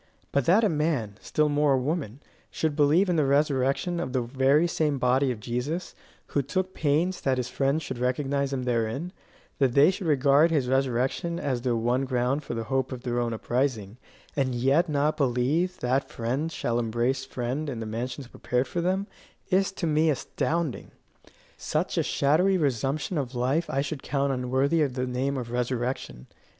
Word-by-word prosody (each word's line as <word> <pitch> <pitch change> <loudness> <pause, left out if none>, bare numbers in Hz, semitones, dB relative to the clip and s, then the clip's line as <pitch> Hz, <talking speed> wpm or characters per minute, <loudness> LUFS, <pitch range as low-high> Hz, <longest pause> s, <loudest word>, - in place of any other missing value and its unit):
But 140 -3 +1
that 195 - +5
a - - +5
man, 150 - -1
still 155 0 +1
more 145 -1 +2
a - - +3
woman, 140 -3 -3 0.3
should 155 -2 -1
believe 155 +6 +4
in 175 -2 +1
the 155 - +3
resurrection 140 +4 +1
of 130 -6 -4
the 130 -2 +1
very 135 +6 +3
same 150 -4 0
body 130 +2 +2
of 115 - -5
Jesus, 125 - -3 0.4
who 140 - +1
took 185 +7 -2
pains 165 +5 0
that 130 -1 +1
his 125 -1 -2
friends 140 +4 0
should 125 - -5
recognize 135 +2 0
him 130 -2 -2
therein; 125 - -1 0.5
that 135 -3 +3
they 140 +6 +6
should 190 -2 -5
regard 145 +2 +4
his 145 -6 +1
resurrection 135 +6 0
as 130 -4 -1
their 120 -1 0
one 120 +4 +1
ground 130 +2 0
for 120 - -5
the 115 - -2
hope 130 +3 -1
of 125 -1 -6
their 120 -1 -1
own 120 -1 -1
uprising, 115 -2 -2 0.4
and 130 -3 0
yet 135 +8 +2
not 150 +1 +1
believe 145 +8 +1
that 130 +2 0
friend 130 +8 -2
shall 120 -6 -1
embrace 120 +3 0
friend 130 +3 -3
in 125 -5 -4
the 110 - -4
mansions 120 +5 -4
prepared 125 +1 -2
for 170 +7 -2
them, 190 +3 0 0.5
is 195 +1 +3
to 185 - -3
me 155 0 +3
astounding. 155 +1 -2 0.7
Such - - -1
a - - +4
shadowy 180 +7 +2
resumption 145 - -1
of 130 -2 -4
life 135 +7 0
I 135 - 0
should 145 0 -4
count 140 0 0
unworthy 130 +5 +1
of 135 -4 0
the 125 -1 -1
name 130 +2 -1
of 120 -2 -5
resurrection. 120 - -3
135 Hz, 185 wpm, -26 LUFS, 125-155 Hz, 0.7 s, they